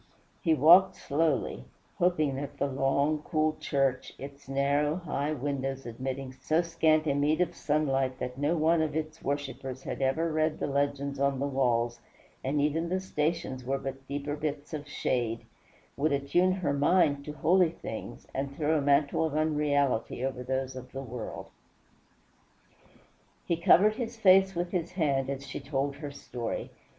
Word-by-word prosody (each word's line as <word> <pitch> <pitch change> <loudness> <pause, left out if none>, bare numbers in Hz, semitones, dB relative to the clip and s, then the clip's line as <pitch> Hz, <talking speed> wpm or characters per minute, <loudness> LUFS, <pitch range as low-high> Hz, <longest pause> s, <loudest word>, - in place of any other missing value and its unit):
He 165 -4 +3
walked 180 +6 +7
slowly, 145 - 0 0.4
hoping 165 -5 +2
that 140 0 -6
the - - +1
long, 140 +2 +1
cool 155 0 0
church, 135 -2 0
its 140 0 -10
narrow 140 +2 +1
high 155 -4 -2
windows 135 -1 -3
admitting 130 +2 -5
so 155 +6 0
scant 160 -2 +2
a 145 - +2
meed 145 +3 +2
of 175 -1 +1
sunlight 135 -5 0
that 125 0 -4
no 145 +5 0
one 160 +1 +3
of 155 -2 -1
its 155 0 -4
worshippers 135 -2 -4
had - - -5
ever 160 +5 +1
read 155 0 +1
the - - -2
legends 140 0 -1
on 140 -1 +2
the 140 - 0
walls, 120 -4 +1 0.4
and 140 +3 0
even 155 +4 0
the 185 +1 0
stations 155 -6 -2
were 135 +2 -1
but 135 0 -7
deeper 145 +1 -3
bits 150 +1 -4
of 150 -1 -5
shade, 120 -5 -1 0.5
would 150 +2 +1
attune 140 +7 +2
her 180 -6 -1
mind 145 -1 +3
to 150 - -5
holy 170 +4 +3
things, 165 - -7
and 140 +1 -3
throw 155 0 +2
a - - -1
mantle 140 +2 +3
of 160 -2 -1
unreality 145 -5 +1
over 130 -2 -3
those 130 +1 -2
of 130 0 -9
the 135 0 -5
world. 120 -3 -7 1.9
He 170 - +1
covered 190 +5 +5
his 235 -1 -4
face 190 -2 +5
with 175 +1 -2
his 175 -1 -2
hand 140 -6 +1
as 140 0 -4
she 135 - -6
told 140 0 -2
her 145 -1 -6
story. 125 -4 -5
145 Hz, 165 wpm, -29 LUFS, 135-160 Hz, 1.9 s, walked